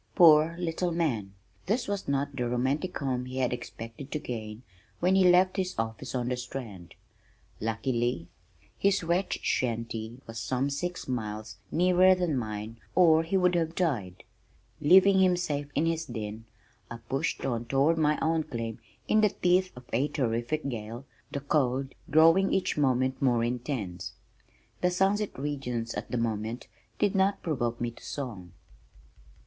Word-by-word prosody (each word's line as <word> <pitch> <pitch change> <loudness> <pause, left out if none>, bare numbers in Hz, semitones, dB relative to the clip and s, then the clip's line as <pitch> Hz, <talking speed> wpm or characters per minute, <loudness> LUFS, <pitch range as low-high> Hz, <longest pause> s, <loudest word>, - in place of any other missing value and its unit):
Poor 165 -2 +7
little 175 0 -1
man! 120 - -1 0.3
This 230 +6 0
was 200 -1 -3
not 140 0 -1
the 125 -2 -1
romantic 135 +9 -1
home 130 -3 -2
he 130 +1 -6
had 125 -2 +1
expected 115 +2 -8
to - - -1
gain 110 -4 -6 0.4
when 180 +2 +3
he 190 -1 +5
left 185 +2 +4
his 185 -1 -1
office 115 +3 -3
on 125 -1 -1
the 125 - -1
Strand. 120 -8 -7 0.6
Luckily, 115 -4 -1 0.5
his 195 -2 +2
wretched 175 +3 -1
shanty 115 -1 -2
was 115 0 -7
some 130 +5 -1
six 175 +5 -4
miles 110 -3 -4
nearer 185 +2 +5
than 175 -5 0
mine 110 -1 -4 0.2
or 160 -3 +6
he 165 +4 0
would 180 -1 +3
have 165 -1 0
died. 110 - -1 0.6
Leaving 190 +5 +6
him 185 -1 +4
safe 145 -5 -2
in 150 - +2
his 165 0 0
den, 110 -3 -6 0.4
I 120 - -6
pushed 135 - -1
on 120 -3 -1
toward 140 +7 +2
my 150 -1 +3
own 160 0 +2
claim, 115 -5 -5 0.3
in 215 - +4
the 210 - +5
teeth 185 0 +2
of 125 0 -12
a 130 +6 +2
terrific 130 +2 -1
gale, 115 +1 -5 0.3
the 140 - -3
cold 135 -2 0 0.2
growing 165 +5 +5
each 190 - +1
moment 130 -2 +1
more 120 -4 +3
intense. 120 -6 -3 0.7
"The 180 - +3
sunset 195 +3 +1
regions" 125 -5 -3
at - - -5
that 125 - -2
moment 115 0 -2 0.3
did 205 -2 +2
not 195 0 +1
provoke 120 -7 -1
me 120 0 -2
to - - -17
song. 105 - -6
135 Hz, 155 wpm, -28 LUFS, 115-170 Hz, 0.7 s, Poor